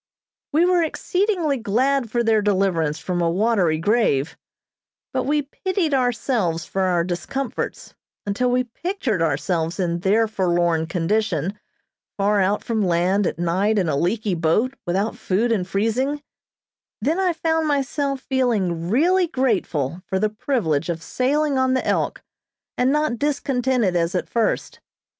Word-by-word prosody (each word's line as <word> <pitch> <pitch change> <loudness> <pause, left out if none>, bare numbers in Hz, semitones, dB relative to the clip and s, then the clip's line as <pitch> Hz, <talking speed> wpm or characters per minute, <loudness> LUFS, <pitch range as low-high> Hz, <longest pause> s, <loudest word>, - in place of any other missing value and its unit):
We 320 +4 +4
were 360 -1 +3
exceedingly 350 -2 0
glad 245 +3 +1
for 235 +2 0
their 220 -2 +3
deliverance 185 -7 +1
from 180 -1 -2
a 170 - +2
watery 185 -3 +2
grave, 165 - +1 0.8
but - - 0
we 295 +1 +1
pitied 345 +2 -2
ourselves 230 - 0
for 195 - -3
our 180 -2 +2
discomforts, 185 +10 -4 0.3
until 205 +5 0
we 250 +1 +2
pictured 250 - -3
ourselves 165 +2 -1
in 170 -2 0
their 210 +5 +2
forlorn 175 -5 +1
condition, 180 0 0 0.6
far 205 +1 +2
out 200 +2 +1
from 225 -3 0
land, 180 +2 +2
at - - -3
night, 185 +6 +1
in 185 -4 +1
a 150 - 0
leaky 200 +6 0
boat, 175 +10 +1
without 195 +5 0
food 220 +6 0
and 190 -5 0
freezing; 245 +9 -1 0.8
then 320 +6 0
I 370 -2 +2
found 320 -1 0
myself 280 -1 -1
feeling 205 -12 0
really 350 - +3
grateful 185 - -1
for 190 - -1
the 215 +2 +1
privilege 205 - -1
of 165 -1 -3
sailing 280 +2 0
on 260 0 +2
the 260 - -1
"Elk," - - -1 0.5
and 255 +2 +2
not 300 -5 0
discontented 255 -8 0
as 170 +1 0
at 180 - -1
first. 230 -2 -1
215 Hz, 145 wpm, -22 LUFS, 175-270 Hz, 0.8 s, We